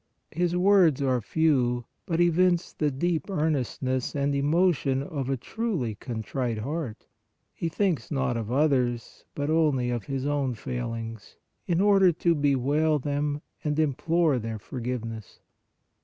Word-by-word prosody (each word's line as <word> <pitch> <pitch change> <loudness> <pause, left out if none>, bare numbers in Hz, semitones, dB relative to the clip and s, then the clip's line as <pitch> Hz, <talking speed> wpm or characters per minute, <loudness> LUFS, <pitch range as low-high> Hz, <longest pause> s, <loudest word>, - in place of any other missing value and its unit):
His 175 +1 0
words 180 -6 +5
are 130 -2 +1
few 125 -4 +1 0.2
but 165 -1 0
evince 175 +1 +3
the 150 - 0
deep 160 +4 -1
earnestness 135 - -1
and 140 0 +1
emotion 140 -2 +2
of 140 -5 -4
a 135 - 0
truly 175 - -2
contrite 115 +2 -3
heart. 135 0 -4 0.5
He 165 - -3
thinks 165 - 0
not 135 -4 0
of 115 -1 -3
others, 130 -4 0
but 145 +1 -1
only 145 -6 +2
of 120 -3 -3
his 135 -1 -3
own 140 -4 0
failings, 115 -3 -5 0.3
in 170 -1 +1
order 195 -2 +5
to 170 +1 +2
bewail 145 +1 +2
them 145 +1 -2 0.2
and 150 -1 -1
implore 155 0 +2
their 115 -1 -4
forgiveness. 115 -1 -6
140 Hz, 135 wpm, -27 LUFS, 125-160 Hz, 0.5 s, words